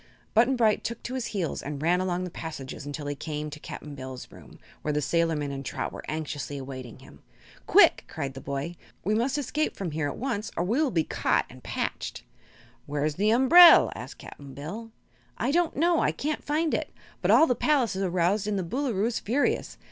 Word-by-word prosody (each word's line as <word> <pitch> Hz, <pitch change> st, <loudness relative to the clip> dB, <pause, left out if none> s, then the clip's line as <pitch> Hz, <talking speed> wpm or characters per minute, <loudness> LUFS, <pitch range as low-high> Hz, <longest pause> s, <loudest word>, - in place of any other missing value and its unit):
Button 240 Hz, +4 st, +4 dB
Bright 225 Hz, -3 st, +2 dB
took 235 Hz, 0 st, -5 dB
to 250 Hz, -, -5 dB
his 255 Hz, -2 st, -2 dB
heels 185 Hz, -7 st, -2 dB
and 145 Hz, 0 st, -5 dB
ran 175 Hz, +4 st, +2 dB
along 180 Hz, -1 st, -1 dB
the 180 Hz, -, -5 dB
passages 145 Hz, -4 st, -7 dB
until 145 Hz, +1 st, -5 dB
he 145 Hz, -, -2 dB
came 150 Hz, +1 st, -5 dB
to 150 Hz, -, -8 dB
Cap'n 150 Hz, 0 st, -8 dB
Bill's 130 Hz, -2 st, -8 dB
room, -, -, -14 dB, 0.2 s
where 150 Hz, -, -1 dB
the 150 Hz, -, 0 dB
sailorman 160 Hz, -2 st, 0 dB
and 135 Hz, 0 st, -5 dB
Trot -, -, -4 dB
were -, -, -7 dB
anxiously 150 Hz, -2 st, -4 dB
awaiting 130 Hz, -3 st, -8 dB
him. -, -, -16 dB, 0.5 s
"Quick!" -, -, +6 dB
cried 140 Hz, -4 st, -4 dB
the 135 Hz, -, -9 dB
boy; 140 Hz, +6 st, -4 dB, 0.3 s
"we 210 Hz, -, +1 dB
must 250 Hz, +6 st, +1 dB
escape 295 Hz, +2 st, -1 dB
from 185 Hz, -4 st, -4 dB
here 150 Hz, -1 st, -1 dB
at -, -, -5 dB
once 230 Hz, -4 st, -2 dB
or 170 Hz, -, +1 dB
we 230 Hz, -, +1 dB
will 305 Hz, -, +2 dB
be 165 Hz, -9 st, +1 dB
caught -, -, +1 dB
and -, -, -13 dB
patched." -, -, -4 dB, 0.6 s
"Where's 145 Hz, +1 st, -1 dB
the 205 Hz, +7 st, +1 dB
umbrel?" 295 Hz, +9 st, +8 dB
asked -, -, -8 dB
Cap'n 140 Hz, -2 st, -11 dB
Bill. 200 Hz, +11 st, -7 dB, 0.5 s
"I -, -, 0 dB
don't 340 Hz, +1 st, +1 dB
know. 335 Hz, +2 st, +3 dB
I -, -, +2 dB
can't 300 Hz, +1 st, -3 dB
find 310 Hz, +2 st, 0 dB
it. -, -, -1 dB, 0.3 s
But -, -, 0 dB
all 320 Hz, -, +7 dB
the 250 Hz, -, +2 dB
palace 255 Hz, -6 st, +1 dB
is 190 Hz, -, -2 dB
aroused 185 Hz, +2 st, +1 dB
and 210 Hz, -1 st, 0 dB
the 190 Hz, -, -1 dB
Boolooroo 225 Hz, +1 st, -1 dB
is 235 Hz, 0 st, -1 dB
furious. 255 Hz, +7 st, 0 dB
180 Hz, 210 wpm, -27 LUFS, 150-245 Hz, 0.6 s, umbrel